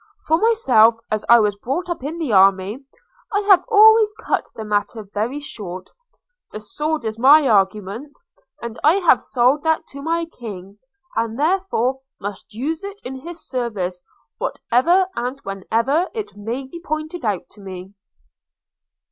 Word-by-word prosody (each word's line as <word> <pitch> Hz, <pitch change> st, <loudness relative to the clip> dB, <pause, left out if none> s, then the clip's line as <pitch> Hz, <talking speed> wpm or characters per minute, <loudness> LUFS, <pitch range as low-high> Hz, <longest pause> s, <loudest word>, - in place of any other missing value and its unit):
For 320 Hz, +1 st, +2 dB
myself, 255 Hz, -, +4 dB
as 215 Hz, -1 st, -1 dB
I 235 Hz, 0 st, +8 dB
was 210 Hz, -2 st, +1 dB
brought 270 Hz, -, -3 dB
up 345 Hz, -6 st, -4 dB
in 305 Hz, +4 st, -4 dB
the 305 Hz, -9 st, -2 dB
army, 195 Hz, +5 st, +3 dB, 0.5 s
I 410 Hz, -1 st, +1 dB
have 395 Hz, -3 st, +5 dB
always 440 Hz, 0 st, +7 dB
cut -, -, -2 dB
the 220 Hz, -, -6 dB
matter 210 Hz, +1 st, -2 dB
very 215 Hz, +7 st, -3 dB
short 185 Hz, -10 st, -8 dB, 0.3 s
– -, -, -53 dB
the 215 Hz, -, -6 dB
sword 300 Hz, +6 st, -3 dB
is 220 Hz, 0 st, -4 dB
my 285 Hz, +3 st, +6 dB
argument; 210 Hz, +5 st, 0 dB, 0.5 s
and 235 Hz, -1 st, -6 dB
I 310 Hz, +4 st, +5 dB
have 375 Hz, -4 st, +4 dB
sold 255 Hz, +4 st, +2 dB
that 320 Hz, 0 st, 0 dB
to 280 Hz, -, -9 dB
my 330 Hz, +3 st, -1 dB
King, 205 Hz, -, -10 dB, 0.4 s
and 230 Hz, 0 st, -1 dB
therefore 300 Hz, -7 st, 0 dB, 0.2 s
must 200 Hz, 0 st, -7 dB
use 300 Hz, -, -3 dB
it 400 Hz, 0 st, -7 dB
in 260 Hz, +1 st, -6 dB
his 340 Hz, +5 st, -10 dB
service, 205 Hz, -8 st, -3 dB, 0.4 s
whatever 340 Hz, +11 st, +2 dB
and 250 Hz, +3 st, -3 dB
wherever 230 Hz, -, 0 dB
it 425 Hz, -, -5 dB
may 230 Hz, +6 st, -5 dB
be 305 Hz, +6 st, -10 dB
pointed 310 Hz, +2 st, -4 dB
out 205 Hz, -5 st, -2 dB
to 210 Hz, -, -14 dB
me.' 190 Hz, 0 st, -9 dB
250 Hz, 155 wpm, -20 LUFS, 210-325 Hz, 0.5 s, I